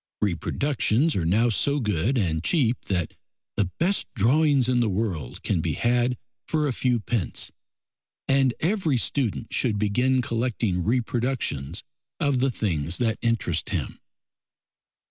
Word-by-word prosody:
Reproductions 130 - +1
are 85 -4 0
now 110 +7 +3
so 140 +6 +1
good 105 - 0
and 80 -7 0
cheap 125 - +1
that 90 -5 -1 0.4
the 95 -3 +1
best 190 +4 +1
drawings 135 +4 +3
in 125 -1 +2
the 115 -3 +2
world 95 - -3
can - - 0
be - - -1
had 120 +1 +1 0.3
for 155 -1 +1
a 135 - 0
few 125 -1 +1
pence, 110 -4 -2 0.8
and 135 -2 +3
every 170 -5 +1
student 120 -2 -2
should 115 -5 +1
begin 125 +5 +2
collecting 115 -6 -1
reproductions 120 - -1 0.4
of 140 -3 +1
the 135 +2 +2
things 85 - -1
that 115 -3 0
interest 110 -9 0
him. - - -3
120 Hz, 135 wpm, -25 LUFS, 100-130 Hz, 0.8 s, now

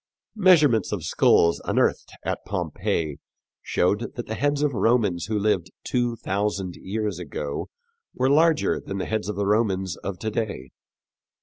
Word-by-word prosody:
Measurements 155 - +5
of 100 -6 -3
skulls 85 +1 +3
unearthed - - 0
at - - -2
Pompeii 75 -3 -2 0.4
showed 105 +6 0
that 120 - -5
the 110 - -4
heads 145 +4 0
of 150 - +2
the 115 - -3
Romans 105 -5 +2
who 110 -1 -1
lived 100 -4 +1
two 120 -2 0
thousand 100 -3 -2
years 105 -2 -3
ago 75 -3 -5 0.5
were 130 - +1
larger 155 +3 +3
than 100 - -6
the 95 - -2
heads 110 -1 -2
of 105 - -3
the 100 - -1
Romans 100 -3 +1
of 100 -2 -5
to 110 +3 -3
day. 100 - -3
105 Hz, 160 wpm, -24 LUFS, 95-120 Hz, 0.5 s, Measurements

